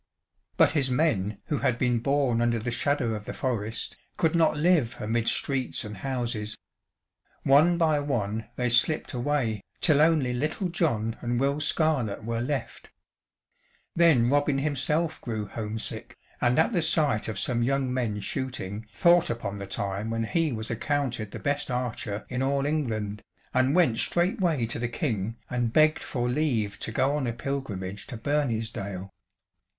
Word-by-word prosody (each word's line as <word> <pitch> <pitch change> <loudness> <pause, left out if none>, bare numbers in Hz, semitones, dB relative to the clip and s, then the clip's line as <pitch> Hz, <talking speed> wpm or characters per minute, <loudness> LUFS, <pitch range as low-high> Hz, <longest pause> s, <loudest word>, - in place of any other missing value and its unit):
But - - +5
his 145 -4 +1
men 120 -8 +1
who 150 - -1
had 120 - +1
been 120 -1 +1
born 135 -2 +1
under 120 0 +2
the 115 +2 -3
shadow 125 -1 +1
of 105 -1 -5
the - - -5
forest, 115 -4 -2 0.2
could 160 -1 +2
not 160 -3 +3
live 155 -6 +2
amid 115 +2 -1
streets 135 -2 0
and 105 -1 -7
houses. 115 -3 -3 0.9
One 155 +6 +5
by 160 -3 +3
one 115 -6 -2
they 125 - 0
slipped 125 +7 +2
away, 120 -5 0 0.2
till 150 -4 +4
only 155 -6 +3
little 155 +9 -1
John 115 -11 0
and 120 0 -1
Will 140 +2 +1
Scarlett 145 -9 0
were 115 +1 -2
left. 135 0 -4 1.1
Then 160 -9 +5
Robin 145 +1 +2
himself 150 +3 0
grew 110 -3 -3
home 110 +2 -5
sick, - - -6 0.2
and 120 +2 +3
at 160 +9 +3
the 175 - +2
sight 155 -8 +2
of 110 -3 -4
some 120 +3 +1
young 130 +1 +1
men 115 -5 -1
shooting 110 -4 -4
thought 175 0 +4
upon 105 -4 -3
the 100 - -6
time 100 +2 -3
when 115 0 -1
he 160 +6 +1
was 110 -1 -3
accounted 120 -3 -1
the - - -7
best 145 -1 -1
archer 120 -4 -3
in 125 0 -3
all 140 +1 +1
England, 110 -9 -2 0.3
and 130 +3 +3
went 130 -11 +3
straightway 175 - +1
to 115 - -4
the 120 0 -1
King 115 - -2
and 120 -2 -1
begged 155 0 +5
for 120 -3 -2
leave 120 -7 0
to - - -3
go 135 +5 +1
on 140 -4 -1
a 115 - -1
pilgrimage 110 -7 -4
to 125 - -6
Bernisdale. 110 -8 -2
125 Hz, 165 wpm, -27 LUFS, 110-145 Hz, 1.1 s, But